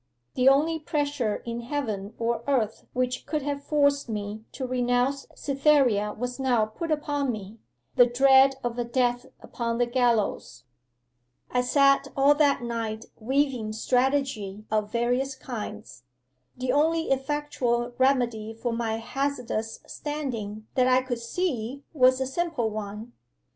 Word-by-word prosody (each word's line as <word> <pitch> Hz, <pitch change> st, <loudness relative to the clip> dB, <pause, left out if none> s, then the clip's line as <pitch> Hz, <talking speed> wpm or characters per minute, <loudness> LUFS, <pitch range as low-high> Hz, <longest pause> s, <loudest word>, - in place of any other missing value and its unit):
The 255 Hz, +1 st, +5 dB
only 315 Hz, +4 st, +3 dB
pressure 290 Hz, -7 st, -1 dB
in 235 Hz, 0 st, -4 dB
heaven 225 Hz, -6 st, -4 dB
or 230 Hz, 0 st, -1 dB
earth 230 Hz, -6 st, 0 dB
which 255 Hz, 0 st, -2 dB
could 305 Hz, -3 st, -1 dB
have 285 Hz, 0 st, -3 dB
forced 285 Hz, -3 st, +2 dB
me 210 Hz, 0 st, -5 dB
to 265 Hz, -, -4 dB
renounce 250 Hz, +2 st, 0 dB
Cytherea 275 Hz, -7 st, +2 dB
was 245 Hz, +2 st, -5 dB
now 245 Hz, -5 st, +2 dB
put 220 Hz, +10 st, -6 dB
upon 290 Hz, -3 st, 0 dB
me 215 Hz, 0 st, -8 dB, 0.4 s
the 245 Hz, -, +8 dB
dread 265 Hz, +2 st, +5 dB
of 240 Hz, 0 st, -3 dB
a -, -, +1 dB
death 245 Hz, +1 st, 0 dB
upon 230 Hz, -1 st, -3 dB
the 245 Hz, -, +3 dB
gallows. 235 Hz, -, 0 dB, 0.9 s
'I 250 Hz, -, +2 dB
sat 275 Hz, +2 st, +4 dB
all 275 Hz, +2 st, +6 dB
that 290 Hz, -4 st, +2 dB
night 225 Hz, -2 st, -3 dB
weaving 250 Hz, -2 st, 0 dB
strategy 245 Hz, -4 st, 0 dB
of 210 Hz, -1 st, 0 dB
various 245 Hz, +3 st, 0 dB
kinds. 215 Hz, -, -7 dB, 0.6 s
The 255 Hz, 0 st, -1 dB
only 320 Hz, +3 st, +2 dB
effectual 265 Hz, -3 st, -1 dB
remedy 240 Hz, -5 st, +1 dB
for 235 Hz, +1 st, -3 dB
my 230 Hz, -1 st, -1 dB
hazardous 240 Hz, -2 st, -3 dB
standing 230 Hz, -8 st, -5 dB
that 255 Hz, -2 st, +3 dB
I 255 Hz, 0 st, +4 dB
could 245 Hz, -2 st, -3 dB
see 260 Hz, -1 st, -3 dB
was 255 Hz, -3 st, +4 dB
a 265 Hz, -, 0 dB
simple 270 Hz, -5 st, -1 dB
one. 210 Hz, +2 st, -6 dB
250 Hz, 140 wpm, -26 LUFS, 225-275 Hz, 0.9 s, the